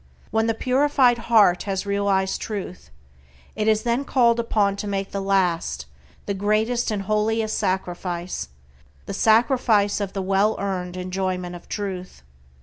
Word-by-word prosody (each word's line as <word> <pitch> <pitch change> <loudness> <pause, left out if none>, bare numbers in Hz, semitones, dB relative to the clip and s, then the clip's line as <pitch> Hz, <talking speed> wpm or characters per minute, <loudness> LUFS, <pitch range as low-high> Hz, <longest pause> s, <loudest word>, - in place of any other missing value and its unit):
When 220 +1 +1
the 225 - 0
purified 255 -1 +3
heart 205 -6 +5
has 190 0 -2
realized 200 -1 0
Truth 195 - -6 0.7
it 215 - -1
is 215 -1 +3
then 240 +3 0
called 235 -4 +3
upon 210 -4 +1
to 205 - -4
make 195 -1 -3
the 200 - -3
last, 175 - 0 0.4
the 200 - -2
greatest 215 +5 0
and 205 -2 -2
holiest 215 +2 0
sacrifice, 180 - -3 0.6
the - - -5
sacrifice 220 -3 +3
of 200 -2 -3
the 195 - -2
well 195 +3 +1
earned 185 -2 -3
enjoyment 185 -1 -3
of 175 - -13
Truth. 185 - -5
200 Hz, 145 wpm, -23 LUFS, 190-220 Hz, 0.7 s, heart